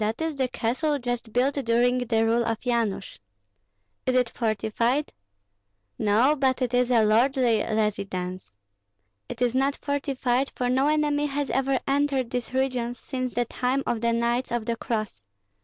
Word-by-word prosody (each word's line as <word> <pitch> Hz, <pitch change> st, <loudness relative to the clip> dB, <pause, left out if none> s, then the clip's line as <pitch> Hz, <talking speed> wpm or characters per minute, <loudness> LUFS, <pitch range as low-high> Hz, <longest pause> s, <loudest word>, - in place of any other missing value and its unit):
"That 215 Hz, +2 st, -1 dB
is 320 Hz, -2 st, -2 dB
the 265 Hz, -2 st, 0 dB
castle 260 Hz, +6 st, -1 dB
just 245 Hz, -3 st, -4 dB
built 255 Hz, +5 st, +2 dB
during 245 Hz, -2 st, +2 dB
the 225 Hz, -2 st, +1 dB
rule 230 Hz, +1 st, +2 dB
of 225 Hz, -1 st, -2 dB
Yanush." 230 Hz, -5 st, -1 dB, 0.9 s
"Is 255 Hz, -, +2 dB
it 250 Hz, -2 st, +3 dB
fortified?" 230 Hz, +5 st, -1 dB, 0.9 s
"No, 225 Hz, +7 st, +3 dB
but 265 Hz, -3 st, +1 dB
it 250 Hz, -1 st, -2 dB
is 245 Hz, 0 st, +2 dB
a 235 Hz, -3 st, +4 dB
lordly 235 Hz, 0 st, +3 dB
residence. 195 Hz, -4 st, -2 dB, 0.8 s
It -, -, -3 dB
is 245 Hz, -1 st, +1 dB
not 270 Hz, +2 st, +1 dB
fortified, 275 Hz, -2 st, -1 dB
for 250 Hz, -1 st, -1 dB
no 265 Hz, +3 st, +2 dB
enemy 295 Hz, -1 st, +1 dB
has 285 Hz, -1 st, -2 dB
ever 270 Hz, 0 st, +1 dB
entered 275 Hz, -3 st, +1 dB
these 245 Hz, -1 st, -3 dB
regions 255 Hz, -2 st, -1 dB
since 255 Hz, -2 st, -4 dB
the 240 Hz, 0 st, +1 dB
time 255 Hz, +3 st, -1 dB
of 230 Hz, -2 st, -1 dB
the 235 Hz, 0 st, +2 dB
Knights 235 Hz, +2 st, 0 dB
of 235 Hz, -2 st, -1 dB
the 235 Hz, 0 st, -1 dB
Cross. 215 Hz, -, -3 dB
245 Hz, 160 wpm, -26 LUFS, 230-270 Hz, 0.9 s, a